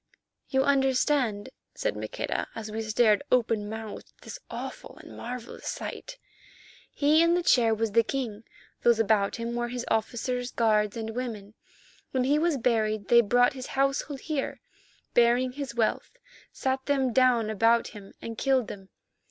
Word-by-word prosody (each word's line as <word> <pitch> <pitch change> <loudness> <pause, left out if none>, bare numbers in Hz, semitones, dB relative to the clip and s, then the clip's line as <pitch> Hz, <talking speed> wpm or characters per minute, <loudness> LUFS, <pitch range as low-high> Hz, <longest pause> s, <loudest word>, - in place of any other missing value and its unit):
"You 265 -1 +2
understand," 265 -5 +1 0.3
said - - -2
Maqueda, - - -3
as 220 -1 -6
we 220 +1 -3
stared, 215 -1 +3
open 225 -4 +1
mouthed 220 -1 -7
at - - -21
this - - -8
awful - - -7
and - - -12
marvellous 245 0 -7
sight, - - -6 0.7
"he 300 +2 +3
in 335 +1 +4
the 355 - 0
chair 230 -7 +4
was 225 0 -1
the 230 +3 +5
king. 230 -3 -4 0.4
Those 235 -1 +4
about 215 -2 +2
him 235 0 -4
were 240 0 -1
his 245 0 -5
officers, 245 +2 -1
guards, 215 -3 +1
and 225 -1 -4
women. 220 -4 -5 0.6
When 260 -1 0
he 285 +4 +2
was 330 -2 +1
buried 215 -4 0
they 235 0 +7
brought 245 +3 +3
his 255 -1 -7
household 275 0 0
here, 300 -4 -3 0.5
bearing 240 +2 +3
his 265 -2 -6
wealth, 235 - -1 0.3
sat 265 0 -2
them 265 -4 +1
down 245 -4 +3
about 230 +2 +3
him, 205 -3 -12
and 230 -1 -6
killed 265 -4 +1
them. 195 -1 -9
240 Hz, 160 wpm, -27 LUFS, 220-265 Hz, 0.7 s, they